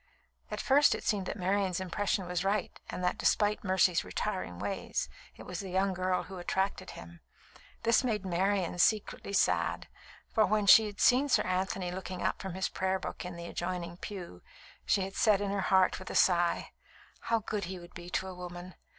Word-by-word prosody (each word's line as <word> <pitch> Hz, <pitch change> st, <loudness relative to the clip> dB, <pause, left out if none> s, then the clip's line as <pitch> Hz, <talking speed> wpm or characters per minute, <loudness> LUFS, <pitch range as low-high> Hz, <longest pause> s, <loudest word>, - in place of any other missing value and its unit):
At -, -, -4 dB
first 285 Hz, +2 st, +4 dB
it -, -, -7 dB
seemed 200 Hz, -3 st, 0 dB
that -, -, -4 dB
Marian's 190 Hz, -1 st, 0 dB
impression 190 Hz, +1 st, -1 dB
was 180 Hz, 0 st, -2 dB
right, 200 Hz, 0 st, 0 dB, 0.2 s
and 180 Hz, -, -5 dB
that, 180 Hz, -, 0 dB
despite 210 Hz, 0 st, +2 dB
Mercy's 185 Hz, -2 st, +3 dB
retiring 185 Hz, -, -3 dB
ways, -, -, -3 dB, 0.3 s
it -, -, -11 dB
was 180 Hz, -1 st, -6 dB
the 195 Hz, -, -5 dB
young 190 Hz, +1 st, +1 dB
girl 185 Hz, 0 st, 0 dB
who 190 Hz, -2 st, -9 dB
attracted 190 Hz, +1 st, -1 dB
him. 85 Hz, 0 st, -11 dB, 0.6 s
This 230 Hz, +2 st, +4 dB
made 215 Hz, -6 st, -1 dB
Marian 185 Hz, 0 st, 0 dB
secretly 210 Hz, +1 st, +1 dB
sad; 200 Hz, -, +1 dB, 0.5 s
for 220 Hz, -, +4 dB
when 210 Hz, +1 st, +1 dB
she 220 Hz, +2 st, +8 dB
had 205 Hz, -1 st, -9 dB
seen 260 Hz, +3 st, +4 dB
Sir -, -, +4 dB
Anthony 185 Hz, 0 st, -1 dB
looking 185 Hz, 0 st, -5 dB
up -, -, -1 dB
from 190 Hz, -2 st, -5 dB
his 190 Hz, 0 st, 0 dB
prayer 190 Hz, 0 st, -1 dB
book 190 Hz, -, -6 dB
in 180 Hz, -1 st, -6 dB
the 170 Hz, 0 st, -7 dB
adjoining 175 Hz, 0 st, -4 dB
pew, 180 Hz, -, -8 dB, 0.5 s
she 195 Hz, -, +3 dB
had 195 Hz, +1 st, -5 dB
said 210 Hz, -3 st, +4 dB
in 200 Hz, -1 st, -2 dB
her 200 Hz, -1 st, -1 dB
heart, 190 Hz, -1 st, +3 dB
with 185 Hz, -, -9 dB
a -, -, -5 dB
sigh: 175 Hz, -2 st, +3 dB, 0.6 s
"How 230 Hz, -, +4 dB
good 210 Hz, -2 st, -3 dB
he 185 Hz, +1 st, -6 dB
would 175 Hz, 0 st, -13 dB
be 175 Hz, 0 st, -9 dB
to 190 Hz, -, -1 dB
a 190 Hz, -, -6 dB
woman! 180 Hz, 0 st, -8 dB
190 Hz, 195 wpm, -31 LUFS, 180-200 Hz, 0.6 s, she